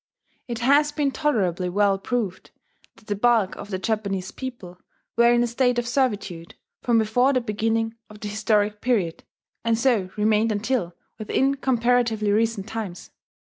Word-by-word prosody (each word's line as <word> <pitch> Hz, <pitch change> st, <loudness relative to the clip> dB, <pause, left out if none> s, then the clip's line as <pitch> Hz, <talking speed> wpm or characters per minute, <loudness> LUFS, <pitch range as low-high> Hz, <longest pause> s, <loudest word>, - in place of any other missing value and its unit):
It 235 Hz, -2 st, -4 dB
has 290 Hz, +3 st, +4 dB
been 295 Hz, -2 st, 0 dB
tolerably 190 Hz, -, 0 dB
well 200 Hz, +1 st, +2 dB
proved 210 Hz, -4 st, -3 dB, 0.5 s
that -, -, -21 dB
the 205 Hz, -, -2 dB
bulk 220 Hz, -2 st, +2 dB
of 205 Hz, -, -9 dB
the 190 Hz, -, -2 dB
Japanese 195 Hz, -2 st, -2 dB
people 220 Hz, -9 st, -8 dB, 0.4 s
were 235 Hz, +1 st, +5 dB
in 240 Hz, 0 st, +3 dB
a -, -, +2 dB
state 245 Hz, +1 st, +1 dB
of 240 Hz, -1 st, -1 dB
servitude 205 Hz, -10 st, -1 dB, 0.3 s
from 235 Hz, -2 st, +2 dB
before 245 Hz, +5 st, +3 dB
the 255 Hz, -, +3 dB
beginning 225 Hz, 0 st, -1 dB, 0.2 s
of 210 Hz, 0 st, -13 dB
the 210 Hz, -, -5 dB
historic 210 Hz, 0 st, 0 dB
period, 205 Hz, -10 st, 0 dB, 0.4 s
and 230 Hz, -1 st, +2 dB
so 230 Hz, -6 st, +2 dB
remained 215 Hz, +1 st, +2 dB
until 210 Hz, -4 st, -1 dB, 0.2 s
within 265 Hz, +5 st, +1 dB
comparatively 240 Hz, -5 st, +1 dB
recent 220 Hz, -1 st, 0 dB
times. 220 Hz, -6 st, -6 dB
225 Hz, 155 wpm, -24 LUFS, 205-245 Hz, 0.5 s, were